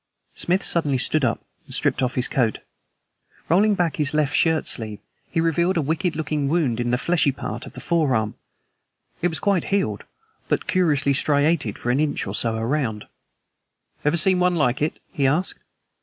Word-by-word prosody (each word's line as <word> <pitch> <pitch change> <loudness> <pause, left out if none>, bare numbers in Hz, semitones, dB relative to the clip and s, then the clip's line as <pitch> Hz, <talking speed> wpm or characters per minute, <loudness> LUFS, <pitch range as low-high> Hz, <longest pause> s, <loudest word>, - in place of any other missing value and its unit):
Smith 185 +3 0
suddenly 150 -6 +2
stood 150 +4 +2
up 115 -2 -1 0.2
and - - -3
stripped - - +1
off 130 -1 -1
his 125 - +4
coat. 115 -5 0 0.9
Rolling 205 +5 +4
back 175 -4 0
his 150 0 0
left 150 -2 +1
shirt 160 -1 +2
sleeve 110 -3 -4 0.3
he - - -1
revealed 170 +3 +1
a - - +2
wicked 160 +3 -1
looking 150 -2 -2
wound 145 -8 +1
in 120 0 -1
the 125 - +2
fleshy 160 +1 +2
part 120 -3 -6
of - - -12
the - - -9
forearm. 130 -11 0 0.9
It 175 - +3
was 160 -4 -3
quite 195 0 +1
healed, 200 -1 -1 0.5
but - - 0
curiously 150 -7 +2
striated 145 -4 +1
for 120 - -2
an 130 - +1
inch 150 -1 0
or 95 - -5
so 115 +1 0
around. 115 -2 -2 1.0
"Ever 150 +3 +2
seen 185 +3 +4
one 180 0 +2
like 135 -4 +1
it?" 150 - -1
he 140 -2 +1
asked. 160 +8 +1
150 Hz, 180 wpm, -23 LUFS, 125-170 Hz, 1.0 s, his